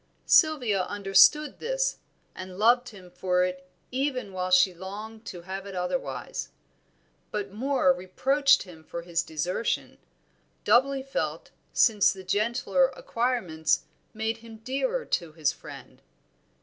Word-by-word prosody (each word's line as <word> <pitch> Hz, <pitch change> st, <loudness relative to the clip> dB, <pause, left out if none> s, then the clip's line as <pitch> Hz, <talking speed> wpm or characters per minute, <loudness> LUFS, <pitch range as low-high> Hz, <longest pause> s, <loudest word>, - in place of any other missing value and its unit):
Sylvia 255 Hz, -, +4 dB
understood 205 Hz, +9 st, +4 dB
this, -, -, -1 dB, 0.4 s
and 185 Hz, 0 st, -9 dB
loved 245 Hz, +4 st, +4 dB
him 185 Hz, -4 st, -14 dB
for 180 Hz, 0 st, +1 dB
it 185 Hz, 0 st, -4 dB, 0.2 s
even 255 Hz, -6 st, -2 dB
while 185 Hz, 0 st, -2 dB
she 185 Hz, 0 st, +5 dB
longed 210 Hz, +5 st, -8 dB
to 175 Hz, -, -7 dB
have 190 Hz, +2 st, -6 dB
it 195 Hz, -, -8 dB
otherwise. 180 Hz, +9 st, -3 dB, 0.8 s
But 205 Hz, -2 st, -4 dB
Moor 250 Hz, -4 st, +2 dB
reproached 270 Hz, +11 st, +2 dB
him 165 Hz, -4 st, -14 dB
for 170 Hz, +2 st, -7 dB
his 170 Hz, 0 st, 0 dB
desertion, 175 Hz, +8 st, -2 dB, 0.6 s
doubly 265 Hz, +5 st, +3 dB
felt 270 Hz, 0 st, -4 dB, 0.2 s
since 215 Hz, -4 st, +4 dB
the 190 Hz, -1 st, -8 dB
gentler 235 Hz, -, +1 dB
acquirements 230 Hz, -, 0 dB, 0.3 s
made 220 Hz, +1 st, -2 dB
him 225 Hz, -1 st, -12 dB
dearer 475 Hz, -, -1 dB
to 170 Hz, -3 st, -2 dB
his 155 Hz, -3 st, +1 dB
friend. -, -, -12 dB
205 Hz, 125 wpm, -27 LUFS, 185-255 Hz, 0.8 s, she